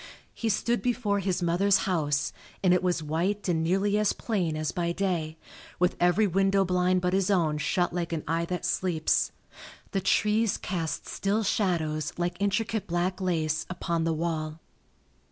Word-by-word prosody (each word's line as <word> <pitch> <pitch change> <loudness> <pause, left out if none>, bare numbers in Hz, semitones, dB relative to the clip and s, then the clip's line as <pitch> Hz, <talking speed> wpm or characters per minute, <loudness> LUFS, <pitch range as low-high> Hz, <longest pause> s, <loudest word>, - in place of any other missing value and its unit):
He 225 - -2
stood 235 +3 +1
before 230 -5 0
his 185 -2 -1
mother's 190 +5 +3
house, 150 -7 0 0.3
and 180 -1 +5
it 180 - +3
was 175 -3 0
white 180 +7 -1
and 165 -3 +1
nearly 195 +5 +2
as 210 -1 +2
plain 180 -9 -1
as 155 -1 -1
by 170 -1 -1
day, 170 -5 -1 0.4
with 180 0 +2
every 180 +5 +4
window 195 +1 +2
blind 180 0 +2
but 180 0 0
his 195 0 +2
own 165 -6 +2
shut 175 +4 0
like 175 -1 -2
an 160 -2 -2
eye 165 +2 0
that 180 +1 -3
sleeps. 170 -4 +1 0.6
The 195 - 0
trees 215 +2 +2
cast 165 -4 -3
still 205 +3 0
shadows 160 -7 0
like 175 0 -1
intricate 210 +2 0
black 175 +2 -1
lace 160 -4 0
upon 170 -2 -2
the 165 0 +1
wall. 155 -1 -3
180 Hz, 165 wpm, -28 LUFS, 165-195 Hz, 0.6 s, and